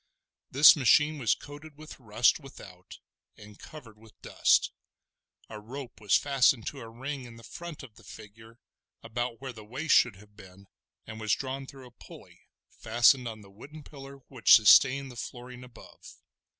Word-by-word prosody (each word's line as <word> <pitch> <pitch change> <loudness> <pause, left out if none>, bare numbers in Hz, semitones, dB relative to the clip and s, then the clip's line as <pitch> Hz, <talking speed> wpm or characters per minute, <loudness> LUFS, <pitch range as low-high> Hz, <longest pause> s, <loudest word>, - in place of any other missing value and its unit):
This 140 +3 +7
machine 150 +2 +2
was 120 -5 +1
coated 145 +1 -14
with 155 0 -13
rust 115 +2 +1
without, 95 -10 -14 0.4
and 105 -1 -16
covered 115 -9 -14
with 110 -1 -21
dust; - - +1 0.8
a 110 - -10
rope 120 +2 -11
was 105 -2 +1
fastened 135 -4 +1
to 140 - -12
a 115 - -10
ring 135 +3 -7
in 120 -1 -13
the 115 - -16
front 170 +6 -10
of 115 -5 -15
the - - -18
figure, 110 +2 -15 0.5
about 120 +1 -5
where 130 -2 -8
the 110 -2 -13
waist 130 +8 -2
should 125 -5 +3
have 105 +1 -20
been, 95 -1 -17 0.4
and 110 0 -10
was 110 -1 0
drawn 135 0 -7
through 135 -1 -14
a 125 - -16
pulley, - - -17 0.3
fastened 120 +3 +2
on 110 -2 -9
the 100 -1 -18
wooden 145 +9 -14
pillar 140 -1 -13
which 130 -5 +5
sustained 135 +5 +4
the - - -14
flooring 125 +1 -10
above. 125 -2 -16
120 Hz, 170 wpm, -27 LUFS, 110-135 Hz, 0.8 s, This